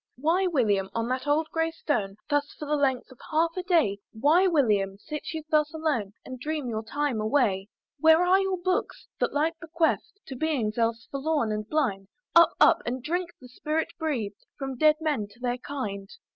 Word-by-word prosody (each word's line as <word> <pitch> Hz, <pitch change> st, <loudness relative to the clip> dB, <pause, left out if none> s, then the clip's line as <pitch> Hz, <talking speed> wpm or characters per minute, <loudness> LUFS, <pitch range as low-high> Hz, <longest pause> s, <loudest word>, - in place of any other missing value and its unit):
"Why 335 Hz, +8 st, +2 dB
William, 210 Hz, -, +1 dB
on 230 Hz, 0 st, -1 dB
that 255 Hz, +2 st, -2 dB
old 305 Hz, +2 st, +2 dB
grey 325 Hz, 0 st, +1 dB
stone, 215 Hz, -12 st, -2 dB
"Thus 290 Hz, -1 st, 0 dB
for 300 Hz, -, -6 dB
the 300 Hz, +1 st, 0 dB
length 270 Hz, -3 st, 0 dB
of 255 Hz, -, -16 dB
half 330 Hz, +1 st, +1 dB
a 365 Hz, -, -2 dB
day, 330 Hz, -, +2 dB
"Why 300 Hz, +11 st, +4 dB
William, 210 Hz, -, +2 dB
sit 300 Hz, +9 st, -6 dB
you 320 Hz, -2 st, -5 dB
thus 300 Hz, 0 st, +2 dB
alone, 285 Hz, -11 st, -1 dB
"And 255 Hz, -1 st, -8 dB
dream 300 Hz, 0 st, -3 dB
your 220 Hz, -2 st, -2 dB
time 280 Hz, -1 st, -1 dB
away? 215 Hz, -4 st, +1 dB, 0.3 s
"Where 320 Hz, +3 st, +6 dB
are 370 Hz, +2 st, +5 dB
your 385 Hz, -1 st, 0 dB
books? 365 Hz, +1 st, -2 dB
that -, -, +1 dB
light 320 Hz, +3 st, 0 dB
bequeath'd 330 Hz, +4 st, -1 dB
"To 265 Hz, -, -7 dB
beings 245 Hz, -7 st, -1 dB
else 230 Hz, 0 st, 0 dB
forlorn 280 Hz, -4 st, 0 dB
and 210 Hz, 0 st, -4 dB
blind! 220 Hz, -11 st, 0 dB, 0.3 s
"Up! 335 Hz, 0 st, +7 dB
Up! -, -, +6 dB
and 245 Hz, +1 st, -4 dB
drink 345 Hz, +4 st, -1 dB
the 255 Hz, -, -13 dB
spirit 305 Hz, +6 st, -2 dB
breath'd 240 Hz, -11 st, -3 dB
"From 270 Hz, -1 st, -4 dB
dead 305 Hz, +4 st, +5 dB
men 290 Hz, -10 st, -1 dB
to 205 Hz, +4 st, -21 dB
their 245 Hz, 0 st, -2 dB
kind. 200 Hz, -9 st, -5 dB
285 Hz, 190 wpm, -27 LUFS, 230-320 Hz, 0.3 s, Up